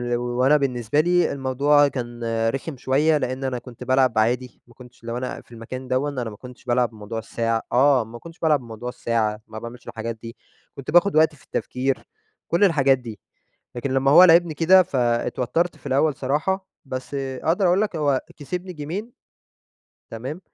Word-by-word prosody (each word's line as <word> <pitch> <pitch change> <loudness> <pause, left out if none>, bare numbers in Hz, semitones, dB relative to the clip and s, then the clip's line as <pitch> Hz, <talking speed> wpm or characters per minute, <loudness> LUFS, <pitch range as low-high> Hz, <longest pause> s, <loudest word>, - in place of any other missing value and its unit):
وأنا 125 +4 +2
بالنسبة 125 -2 0
لي 175 +2 +3
الموضوع 140 +2 +3
كان 120 -3 -5 0.3
رِخِم 135 +4 -4
شوية 145 +5 +2
لأن 130 -1 -3
أنا 130 -2 -2
كنت 125 -1 -11
بالعب 130 -1 +3
عادي، 120 +3 0
ما 120 - -19
كنتش 125 -1 -16
لو 115 +1 -4
أنا 125 0 -5
في - - -27
المكان 125 +3 -8
دوًا 130 +3 0
أنا 125 -5 -4
ما 105 - -10
كنتش 125 0 -13
بالعب 120 -1 +2
بموضوع 110 0 -7
الساعة 115 +1 -1
آه، 130 0 +4
ما 115 +2 -11
كنتش 165 +4 -13
بالعب 155 -3 +3
بموضوع 120 0 -7
الساعة 110 -3 -1
ما 110 -1 -8
باعملش 120 +2 -10
الحاجات 115 +1 -5
دي، 115 0 -9 0.4
كنت 140 +1 -6
باخد 175 +2 +4
وقتي 155 0 +4
في - - -22
التفكير 130 +1 -2 0.4
كل 170 +4 +2
الحاجات 140 -8 +4
دي 115 -5 -9 0.6
لكن 125 +2 -3
لما 135 +1 +3
هو 170 +5 +9
لاعبني 170 -2 +5
كده 185 +4 +6
فاتْوتَّرت 125 +4 0
في - - -16
الأول 140 +2 +2
صراحة، 155 +9 -1 0.2
بس 130 +1 -6
أقدر 140 +7 0
أقول 180 +2 +3
لك 210 -5 -1
هو 145 -4 +1 0.2
كسبني 180 +5 -5
جيْمين 180 +10 -6 1.0
تمام، 130 +10 -6
130 Hz, 175 wpm, -23 LUFS, 120-150 Hz, 1.0 s, هو